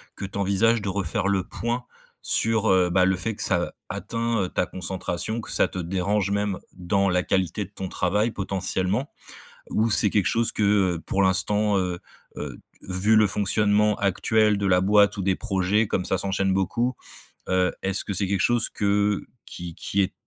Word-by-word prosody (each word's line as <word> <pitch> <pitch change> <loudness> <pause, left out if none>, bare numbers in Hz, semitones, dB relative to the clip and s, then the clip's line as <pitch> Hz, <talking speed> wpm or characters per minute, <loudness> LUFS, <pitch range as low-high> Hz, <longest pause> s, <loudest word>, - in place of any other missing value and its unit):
que - - -6
tu 95 - -7
envisages 105 +4 +2
de 100 - -3
refaire 95 -1 -2
le 100 -2 +1
point 120 +2 -3 0.4
sur, 110 -1 +1
heu, 90 -1 +3
bah 90 +1 +3
le 95 0 +2
fait 100 +5 -3
que - - -2
ça 90 -2 0 0.2
atteint, 115 -1 -2
heu, 90 - -3
ta - - -1
concentration, 95 +4 -3
que - - -7
ça - - +4
te - - -8
dérange 95 +3 -1
même 100 -1 -1 0.2
dans 95 +2 0
la 90 0 +2
qualité 95 +3 -1
de - - -16
ton 95 -2 -6
travail, 105 +7 0
potentiellement 95 +5 -1 0.6
ou 110 +2 +1
c'est 105 -1 +5
quelque 100 -3 +1
chose 115 0 +1
que, - - -2 0.3
heu, - - -8
pour 100 - +1
l'instant, 105 +2 +2
heu 90 -2 -2 0.4
heu, 70 -4 -6 0.2
vu 95 +4 +1
le 110 -1 +5
fonctionnement 105 +1 +2
actuel 105 +2 +2
de 100 - -1
la 90 -1 +3
boîte 105 +1 +4
ou - - -2
des 95 0 +1
projets, 100 0 0
comme 95 - -2
ça 95 - 0
s'enchaîne 95 0 0
beaucoup, 115 +7 0 0.5
heu, 90 0 +2
est-ce 95 0 +1
que - - -4
c'est 100 +1 +3
quelque 100 0 0
chose 120 -1 +2
que 100 0 0 0.2
qui 85 -1 -8
qui 100 - -2
est 95 - 0
100 Hz, 190 wpm, -24 LUFS, 95-105 Hz, 0.6 s, c'est